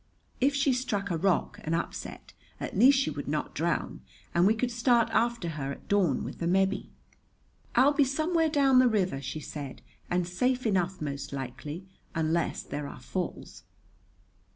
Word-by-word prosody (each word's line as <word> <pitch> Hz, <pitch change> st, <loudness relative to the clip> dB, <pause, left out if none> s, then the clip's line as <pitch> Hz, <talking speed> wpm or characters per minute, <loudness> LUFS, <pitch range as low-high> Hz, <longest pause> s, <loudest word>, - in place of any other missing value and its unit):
If 275 Hz, +2 st, +3 dB
she 275 Hz, -1 st, +3 dB
struck 205 Hz, -6 st, -1 dB
a 170 Hz, -, 0 dB
rock 190 Hz, +1 st, +1 dB
and 160 Hz, +2 st, 0 dB
upset, 165 Hz, -, -5 dB, 0.3 s
at -, -, -5 dB
least 260 Hz, +7 st, +7 dB
she 270 Hz, -, +1 dB
would -, -, -6 dB
not -, -, -2 dB
drown; -, -, -1 dB, 0.3 s
and 175 Hz, +2 st, +4 dB
we 220 Hz, -, +4 dB
could 245 Hz, +2 st, -1 dB
start 235 Hz, 0 st, +3 dB
after 235 Hz, -6 st, +1 dB
her 140 Hz, -3 st, -4 dB
at -, -, -14 dB
dawn 185 Hz, -10 st, +2 dB
with -, -, -7 dB
the 170 Hz, -, -1 dB
Mebbe. 190 Hz, +2 st, +1 dB, 0.9 s
"I'll 270 Hz, +4 st, +6 dB
be 290 Hz, 0 st, +4 dB
somewhere 315 Hz, +4 st, +1 dB
down 275 Hz, -4 st, +5 dB
the 255 Hz, -, +6 dB
river," 190 Hz, -, +1 dB
she 155 Hz, +3 st, -5 dB
said, 145 Hz, -3 st, -7 dB, 0.3 s
"and 175 Hz, -1 st, 0 dB
safe 250 Hz, +8 st, 0 dB
enough, 185 Hz, -4 st, 0 dB
most 140 Hz, -1 st, -4 dB
likely, 140 Hz, +6 st, -6 dB, 0.3 s
unless 165 Hz, +1 st, 0 dB
there 145 Hz, 0 st, -5 dB
are 140 Hz, -, -9 dB
falls." 175 Hz, -, -5 dB
195 Hz, 170 wpm, -29 LUFS, 160-255 Hz, 0.9 s, least